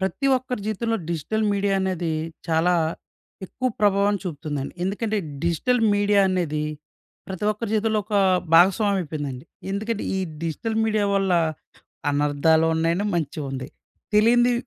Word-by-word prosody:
ప్రతి 190 +8 -1
ఒక్కరి 250 -3 -4
జీవితంలో 225 +2 -1
డిజిటల్ 170 +7 -1
మీడియా 200 0 +1
అనేది, 180 -3 -1 0.4
చాలా 165 +2 +3 0.7
ఎక్కువ 255 +7 -2
ప్రభావం 205 0 +3
చూపుతుందండి. 145 -5 -4
ఎందుకంటే 210 +3 -1 0.3
డిజిటల్ 200 +9 +1
మీడియా 205 0 +3
అనేది 165 -5 -1 0.6
ప్రతి 190 0 -5
ఒక్కరి 215 +1 -4
జీవితంలో 220 0 +1
ఒక 210 -1 -1 0.4
భాగస్వామ్యం 195 +4 +5
అయిపోయిందండి. 145 -6 -5 0.3
ఎందుకంటే 215 +2 -2
ఈ - - 0 0.2
డిజిటల్ 195 +8 -3
మీడియా 215 -2 +1
వల్ల 195 -1 +1 0.8
అనర్థాలు 145 +3 +2
ఉన్నాయి 165 +1 +1
అండీ, 205 +3 -1
మంచి 160 -2 -3
ఉంది. 130 0 -5 0.5
తెలియనిది, 240 +3 +5
195 Hz, 125 wpm, -23 LUFS, 160-215 Hz, 0.8 s, భాగస్వామ్యం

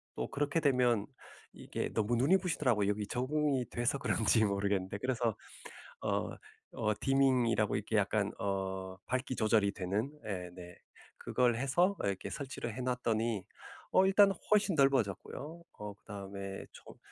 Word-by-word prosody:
또 - - -2
그렇게 145 +3 0
되면 125 -7 +2 0.5
이게 - - -4
너무 110 +2 +1
눈이 145 +11 +5
부시더라고요. 130 - +1
여기 105 0 -1
적응이 135 +2 0
돼서 120 +4 0
그런지 110 -1 +2
모르겠는데 100 -1 0
그래서 120 -2 0 0.7
어 - - 0 0.4
어 105 -1 0
디밍이라고 130 -4 +3
이렇게 - - -3
약간 - - +1
어 95 -1 -3
밝기 130 0 -1
조절이 110 -2 +3
되는 100 +8 -2 0.2
예 90 -4 -4
네 90 -1 -10 0.4
그걸 125 -2 +1
해서 175 +10 +2
이렇게 100 -1 -2
설치를 130 -5 -5
해 130 - -4
놨더니 115 -4 0 0.5
어 190 - +5
일단은 195 0 +5 0.2
훨씬 210 -3 +4
넓어졌고요. 135 - 0 0.2
어 105 -1 -5
그다음에 100 -1 -7
조 - - -13
120 Hz, 310 characters per minute, -33 LUFS, 100-135 Hz, 0.7 s, 눈이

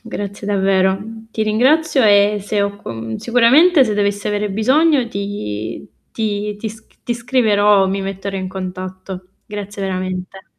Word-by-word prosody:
grazie 205 -3 -6
davvero. 190 -1 +2
Mhmm, 220 +1 -10
ti 220 - -2
ringrazio 265 +7 +3
e 205 0 +4
se 205 +1 -1
ho 200 0 -2
co 115 - -6
sicuramente 265 +7 +5
se 215 -3 -1
dovessi 205 0 -1
avere 210 0 -1
bisogno 265 +6 +3
ti 115 - -5 0.2
ti 210 -1 -2
ti 220 +2 -4
sc 220 +1 -14
ti 240 - -1
scriverò, 210 -5 +3
mi 195 +1 -1
metterò 195 0 -4
in 185 -1 -4
contatto. 185 0 -7 0.2
Grazie 205 -1 -6
veramente. 185 0 -4
205 Hz, 145 wpm, -18 LUFS, 190-220 Hz, 0.2 s, sicuramente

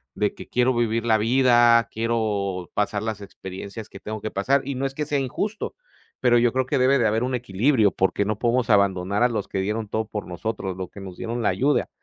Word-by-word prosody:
de 105 0 0
que - - -10
quiero 125 +1 +2
vivir 115 -1 0
la 110 -1 +4
vida, 120 0 +4
quiero 105 -5 -1
pasar 105 0 0
las 110 -2 -4
experiencias 100 +2 -8
que 100 - -11
tengo 110 +1 -6
que 110 - -4
pasar. 135 +8 +1
Y 140 -1 -3
no 135 +2 -2
es 135 - -8
que 150 - -2
sea 145 -1 0
injusto, 200 - -3 0.4
pero 120 -1 +4
yo 120 -1 +3
creo 130 -1 +1
que 130 - 0
debe 135 +2 +4
de 120 - +2
haber 110 +2 +1
un 130 0 -1
equilibrio 115 0 +2
porque 95 +2 0
no 105 0 -1
podemos 120 0 +1
abandonar 100 0 +2
a - - +6
los 105 -4 -3
que 95 - -3
dieron 105 +3 -2
todo 110 +1 -1
por 105 -1 -5
nosotros, 95 +1 -4
los 95 -1 -5
que 100 - -11
nos 95 -2 -9
dieron 115 0 -3
la 100 - +3
ayuda. 135 +11 +1
110 Hz, 230 wpm, -24 LUFS, 100-125 Hz, 0.4 s, a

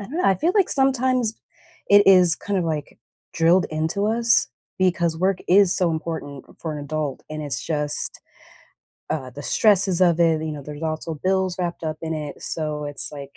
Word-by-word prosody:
I 200 - -6
don't 285 +10 -7
know, - - 0
I 195 - +4
feel 330 - 0
like 395 -3 +3
sometimes 255 -4 +1 0.5
it 205 0 +7
is 180 -3 +6
kind 200 -1 -3
of, 180 - -1
like, 155 -3 -4 0.3
drilled 170 +2 +3
into 160 +6 -1
us 230 +1 +3 0.3
because 170 -3 +1
work 185 +2 +1
is 190 0 +5
so 175 -3 +2
important 155 -4 -5 0.2
for 160 -2 -4
an 145 - -6
adult 150 -2 -4
and 155 0 -5
it's 140 -2 -4
just 150 -2 -2 0.9
uh, 130 -5 -3
the 145 +3 -9
stresses 195 -2 +2
of 175 -2 +4
it, 165 -2 +3
you 160 - -3
know, 145 -2 -7
there's 150 +2 -9
also 160 0 -3
bills 190 -1 0
wrapped 175 -2 -3
up 155 -1 -3
in 160 0 -3
it, 150 -2 -7
so 150 -2 -3
it's 145 +1 -1
like 140 -1 -10
165 Hz, 195 wpm, -22 LUFS, 155-195 Hz, 0.9 s, it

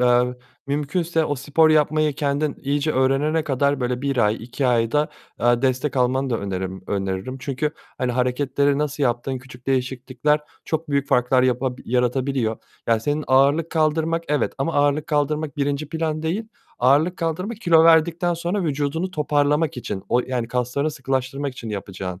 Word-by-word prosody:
eee, 125 0 +3 0.3
mümkünse 160 +4 0
o 145 - -1
spor 145 +4 +3
yapmayı 155 0 +3
kendin 145 0 -1
iyice 145 +2 0
öğrenene 140 +4 +2
kadar 140 0 +1
böyle 125 +1 -1
1 140 -1 -1
ay, 105 -3 +3
2 125 +3 -2
ay 115 -2 +2
da, 150 +1 +2 0.3
eee, 120 +1 +3
destek 130 +1 0
almanı 130 +1 +1
da 115 - 0
önerim 95 -1 -4
öneririm. 95 +5 -3
Çünkü, 140 +3 -2 0.3
hani, 125 -2 0
hareketleri 135 +3 +1
nasıl 150 0 -2
yaptığın, 125 +1 0
küçük 125 -1 -15
değişiklikler 130 +2 0 0.2
çok 160 0 -2
büyük 140 -1 0
farklar 125 +1 +3
yapa 130 0 +1
yaratabiliyor. 125 -1 0 0.3
Yani 115 -1 +2
senin 145 +5 -1
ağırlık 140 +5 +3
kaldırmak 160 +1 +1
evet, 150 0 +1
ama 135 +5 -1
ağırlık 145 +1 +2
kaldırmak, 150 -1 -1
1'nci 145 +1 -1
plan 160 -1 -2
değil. 195 +8 -2 0.3
Ağırlık 145 +8 +3
kaldırma, 180 +7 -2
kilo 170 -7 +4
verdikten 170 +2 +4
sonra 175 +4 -2
vücudunu 150 +4 -1
toparlamak 150 -1 +1
için. 100 -5 -5
O 125 - +3
yani 125 -2 -3
kaslarını 125 +5 -1
sıkılaştırmak 135 0 -2
için 120 -3 -8
yapacağın, 95 -2 -5
140 Hz, 155 wpm, -22 LUFS, 125-155 Hz, 0.3 s, kilo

